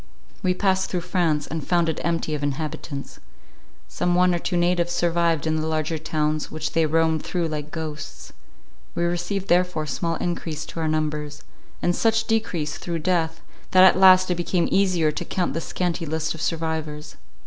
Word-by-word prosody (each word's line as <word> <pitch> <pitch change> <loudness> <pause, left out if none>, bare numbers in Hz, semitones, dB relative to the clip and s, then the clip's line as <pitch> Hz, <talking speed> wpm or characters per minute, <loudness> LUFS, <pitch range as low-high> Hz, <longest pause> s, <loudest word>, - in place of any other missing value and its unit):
We 180 0 +1
passed 190 0 +1
through 180 - -1
France, 165 -5 0
and 160 -2 -4
found 170 +1 +2
it 160 - -2
empty 165 -2 -1
of 150 - -2
inhabitants. 145 0 -4 0.7
Some 175 0 0
one 180 0 +4
or 175 - 0
two 175 +1 -1
natives 175 0 +1
survived 170 -2 +1
in 160 0 +1
the 155 0 -1
larger 155 0 -1
towns, 155 -1 -1
which 155 -1 -4
they 165 -1 +3
roamed 160 0 +2
through 175 -3 -2
like 150 -1 -4
ghosts; 150 - -7 0.6
we 170 - 0
received 175 +3 -1
therefore 180 -3 +2
small 165 +4 -2
encrease 165 -2 -3
to 165 - -7
our 160 - 0
numbers, 150 -1 -2 0.4
and 175 0 +2
such 225 0 +2
decrease 185 -10 -1
through 170 -1 -3
death, 165 -3 0 0.3
that 185 0 +6
at 190 - +7
last 185 -1 +6
it - - +2
became 175 0 +1
easier 180 -5 +3
to 175 - -4
count 180 +1 -1
the 165 - -2
scanty 170 -1 -2
list 160 +1 -1
of 160 - -8
survivors. 160 -2 -3
165 Hz, 180 wpm, -24 LUFS, 155-180 Hz, 0.7 s, at